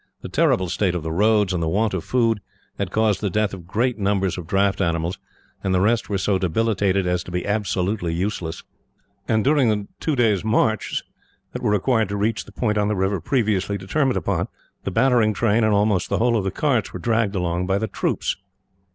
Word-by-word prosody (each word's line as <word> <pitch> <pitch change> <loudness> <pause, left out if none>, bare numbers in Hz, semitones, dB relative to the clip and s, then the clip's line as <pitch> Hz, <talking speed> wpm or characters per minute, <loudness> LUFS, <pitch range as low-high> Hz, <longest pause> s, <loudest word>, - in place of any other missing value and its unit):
The - - -6
terrible 95 0 +2
state 90 +1 0
of 85 - -3
the 80 - -3
roads, 105 +1 +3
and 90 - -1
the 80 - 0
want 105 +5 +1
of 95 - -2
food, 115 -4 +1 0.4
had 100 -2 -1
caused 110 -1 +1
the 105 - 0
death 105 +1 0
of 90 -3 -9
great 120 +4 0
numbers 100 -2 +1
of 90 -3 -7
draught 100 +1 +1
animals, 85 0 -1 0.4
and 95 -1 +1
the - - +3
rest 110 +4 +1
were 100 - 0
so 95 0 +1
debilitated 95 0 +1
as 90 0 0
to - - -10
be 90 0 -3
absolutely 100 -3 -1
useless; 85 -2 -3 0.6
and 110 -1 +2
during 140 -4 +3
the 105 -2 -1
two 155 - 0
days' 110 -6 +2
marches, 110 0 +1 0.5
that - - -5
were - - +1
required 110 +1 +2
to 100 - -2
reach 110 +2 -1
the - - -14
point 105 -3 0
on 105 - +1
the 105 - 0
river 95 -1 0
previously 105 - 0
determined 130 +8 0
upon, - - -1 0.4
the - - 0
battering 115 0 +3
train, 115 +1 +2
and 110 -1 +3
almost 100 -3 +1
the - - +1
whole 120 0 +2
of 105 -4 0
the - - +1
carts, 125 0 0
were 90 - -6
dragged 110 0 0
along 90 0 -1
by 95 0 +2
the 110 - -1
troops. 100 - -2
100 Hz, 210 wpm, -22 LUFS, 95-110 Hz, 0.6 s, roads